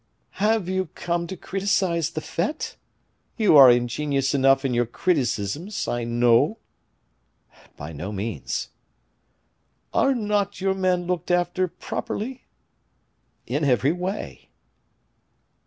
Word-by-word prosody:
"Have 215 -2 +2
you 185 -1 -1
come 170 0 -2
to 190 - -6
criticise 185 -4 0
the 155 -1 -5
fete? 205 - -3 0.6
You 210 -8 +4
are 135 -3 +10
ingenious 135 +3 +1
enough 135 0 +3
in 130 - 0
your 120 -1 +1
criticisms, 145 - -1
I 120 -1 -2
know." 120 - +3 1.2
"By 75 +3 -7
no 90 +7 -5
means." 105 +2 -4 1.2
"Are 275 -1 +3
not 205 -3 -1
your 190 0 +1
men 185 -2 0
looked 180 -1 -3
after 175 +1 +1
properly?" 245 +8 -5 1.0
"In 145 +6 -2
every 135 +1 +3
way." 180 +4 -5
170 Hz, 110 wpm, -24 LUFS, 125-190 Hz, 1.2 s, are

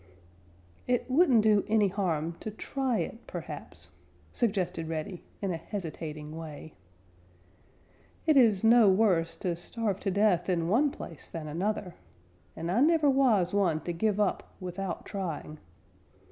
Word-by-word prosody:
"It 245 -1 +1
wouldn't 260 -7 +5
do 210 -2 +4
any 215 -1 +3
harm 170 -4 -1
to - - -5
try 255 +3 -2
it, 230 - -5
perhaps," - - -7 0.4
suggested 190 -8 -1
Reddy, 165 +3 -4 0.2
in 195 - 0
a 165 - -2
hesitating 160 -4 -6
way. 160 -1 -8 1.5
"It 310 -2 +4
is 225 -7 +5
no 225 -2 +7
worse 185 -5 +3
to 175 -2 -2
starve 200 +3 -2
to 195 - -2
death 190 -3 +2
in 170 -2 +1
one 250 - +3
place 165 - -8
than 160 -2 -6
another, 180 +3 -2 0.6
and 165 +2 -3
I 210 - +2
never 305 -1 +4
was 225 -10 +3
one 175 -6 +2
to 175 - -4
give 210 +4 0
up 205 -2 0
without 185 0 -5
trying. 165 -6 -5
195 Hz, 140 wpm, -29 LUFS, 165-220 Hz, 1.5 s, no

